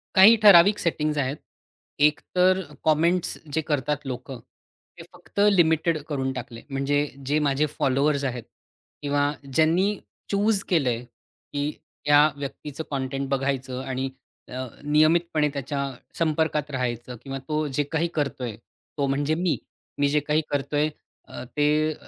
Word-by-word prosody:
काही 195 +5 +9
ठराविक 200 +1 +8
सेटिंग्ज 155 -3 0
आहेत. 140 +2 -1 0.6
एक 150 0 +4 0.2
तर 185 +1 +4 0.2
कमेंट्स 165 +3 +2 0.2
जे 160 - +2
करतात 150 0 -1
लोकं 130 0 -6 0.6
ते - - -9
फक्त - - -9 0.2
लिमिटेड 160 -1 +3
करून 135 -2 -1
टाकले. 120 -2 -7
म्हणजे 140 +1 0 0.3
जे 150 +3 +1
माझे 140 +2 +2
फॉलोवर्स 140 +2 +1
आहेत 125 -3 -3 0.6
किंवा 145 0 +1 0.3
ज्यांनी 165 +6 +3 0.4
चूज 200 0 +2
केलंय 130 -9 +1
की 145 +4 -7 0.4
या 145 +1 +7
व्यक्तीचं 145 +2 -6
कंटेंट 135 0 -2
बघायचं 135 -1 -1
आणि 130 0 -3 0.4
अ, 130 +1 -5 0.2
नियमितपणे 155 +1 +3
त्याच्या 140 0 -3 0.4
संपर्कात 155 -2 0
राहायचं 125 -1 -3
किंवा 135 -1 -5
तो 155 0 0
जे 145 - +3
काही 165 +1 +1
करतोय 130 -7 -2 0.4
तो 140 - +1
म्हणजे 145 +3 0
मी. 175 -1 0 0.4
मी 145 0 +3
जे 150 - +3
काही 150 +2 +1
करतोय 145 +1 0
ते - - -22 0.3
अ, - - -8
ते 150 +3 +1
145 Hz, 135 wpm, -25 LUFS, 135-155 Hz, 0.6 s, काही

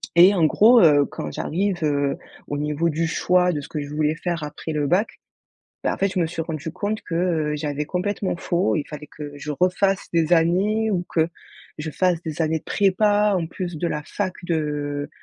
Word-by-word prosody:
Et 180 +4 +8
en 175 -5 +3
gros, 225 +10 +6
heu, 145 -4 +6
quand 75 - -6
j'arrive, 185 - -2
heu, 145 -2 +1 0.3
au 145 - -3
niveau 150 +3 0
du 165 +1 -1
choix 180 +2 +2
de 150 -4 -3
ce - - -10
que 155 - -4
je 145 - -7
voulais 155 0 +1
faire 170 -1 -3
après 150 +2 -6
le 150 -2 0
bac, 185 +8 0 0.6
bah, - - +1
en - - -6
fait, 195 - +2
je 185 - 0
me 170 - +2
suis 165 0 -4
rendu 160 -1 -5
compte 205 +4 -3
que, 165 - -5
heu, 160 -4 0
j'avais 150 0 -3
complètement 190 +3 -2
faux. 175 +3 0
Il 150 - -1
fallait 150 -1 -8
que 145 0 -9
je 150 +1 -5
refasse 185 +5 +1
des 165 -1 +2
années 195 +7 +2
ou 180 -3 -1
que 160 -1 +2 0.5
je 155 +1 -4
fasse 180 0 +1
des 160 0 -3
années 160 0 +1
de - - -28
prépa 205 +1 +2
en 165 -2 -2
plus 175 0 -5
de 170 - -1
la 150 -2 -2
fac 185 +3 -3
de 145 -3 -2
165 Hz, 215 wpm, -23 LUFS, 150-185 Hz, 0.6 s, Et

